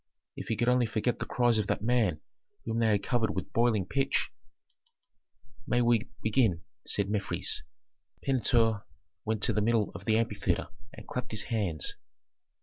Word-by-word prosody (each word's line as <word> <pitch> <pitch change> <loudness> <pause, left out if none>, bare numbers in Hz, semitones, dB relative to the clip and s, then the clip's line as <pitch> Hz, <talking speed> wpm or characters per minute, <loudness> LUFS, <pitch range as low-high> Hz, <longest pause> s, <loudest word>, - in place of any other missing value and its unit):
If - - -7
he 115 - 0
could 120 - 0
only 125 -1 +4
forget 115 +2 -1
the - - -4
cries 120 -2 +3
of 105 - -1
that - - -1
man 110 -9 +2 0.4
whom 115 0 -1
they 115 - +3
had 105 -2 +2
covered 115 -4 0
with 95 - -4
boiling 115 -5 +2
pitch! 135 +7 0 1.4
"We 120 0 +2
may 120 0 +3 0.2
begin," 110 -6 +2 0.2
said 100 -1 +2
Mefres. 105 0 -1 0.6
Pentuer 115 -5 +2 0.4
went 110 -1 -1
to - - +2
the 105 - +1
middle 110 -1 +2
of - - -9
the 110 -1 +3
amphitheatre 105 -6 0 0.2
and - - -11
clapped 125 -1 -4
his 110 -1 -2
hands. 90 -10 -1
110 Hz, 160 wpm, -30 LUFS, 105-120 Hz, 1.4 s, only